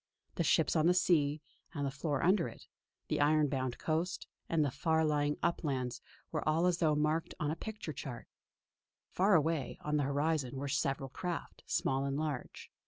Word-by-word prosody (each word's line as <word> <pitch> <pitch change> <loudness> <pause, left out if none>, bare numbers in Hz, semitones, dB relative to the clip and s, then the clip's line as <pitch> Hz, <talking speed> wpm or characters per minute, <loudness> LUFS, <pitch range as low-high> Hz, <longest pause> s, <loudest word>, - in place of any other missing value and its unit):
The 170 - 0
ships 160 0 +3
on 160 0 +4
the 180 - +4
sea, 155 -4 +2 0.3
and 145 -1 -1
the 135 - -1
floor 145 0 -2
under 185 -1 +4
it; - - -11 0.4
the - - 0
iron 150 0 +4
bound 130 -3 -2
coast, 165 +3 -1 0.2
and 160 -2 +2
the 140 - -1
far 160 +3 +1
lying 145 -1 +1
uplands 130 -7 -1 0.3
were 155 - -1
all 160 +3 +3
as 180 -1 +2
though 155 -3 +3
marked 155 +2 0
on 150 0 0
a - - -2
picture 210 -3 -6
chart. 130 -2 -7 0.9
Far 195 +2 +4
away 155 -4 +1
on 150 0 0
the 145 - +2
horizon 140 -2 0
were 140 +1 -3
several 135 -1 -1
craft, 175 +5 -5
small 135 0 +1
and 140 0 -1
large. 150 -4 -4
150 Hz, 180 wpm, -33 LUFS, 140-165 Hz, 0.9 s, on